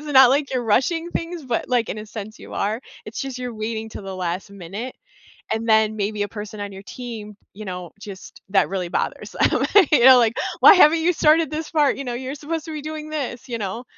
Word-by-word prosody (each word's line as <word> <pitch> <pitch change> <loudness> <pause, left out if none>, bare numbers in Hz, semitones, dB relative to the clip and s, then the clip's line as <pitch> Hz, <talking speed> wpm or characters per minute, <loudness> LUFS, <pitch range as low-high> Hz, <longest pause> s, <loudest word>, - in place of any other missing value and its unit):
It's 300 - -11
not 265 -3 +7
like 275 0 +1
you're 250 -2 -1
rushing 325 +10 +1
things 335 -3 -4
but 240 -2 -2
like 245 -3 +1
in 215 - -4
a 215 - -8
sense 215 0 -8
you - - -12
are. 215 +4 -1 0.2
It's 215 - -6
just 270 -2 -5
you're 250 -2 -5
waiting 220 0 -4
'till 210 - -9
the 195 -1 -6
last 180 +2 -3
minute 200 +6 -7 0.6
and 225 +1 -3
then 220 -1 +4
maybe 205 0 -2
a - - -3
person 210 0 -8
on 205 -1 -5
your 195 +1 -10
team, 220 -3 -8 0.2
you 215 +2 -9
know, 180 -3 -6
just 200 -3 -11
that 195 -2 +3
really 185 -3 -3
bothers - - -3 0.2
um - - +1
and 380 -8 +7
your 260 -2 +8
like, 235 -1 +3 0.3
"Why - - +10
haven't 330 -2 +6
you 340 +2 +3
started 310 -1 +3
this 310 +1 -4
part?" 300 -4 +2
you 275 - -4
know, 245 - -3
"You're 260 +3 -5
supposed 310 +2 -4
to 320 - -7
be 300 - -5
doing 310 0 -6
this," 265 -4 -5
you 235 - -2
know? 205 +4 -4
235 Hz, 235 wpm, -22 LUFS, 210-290 Hz, 0.6 s, Why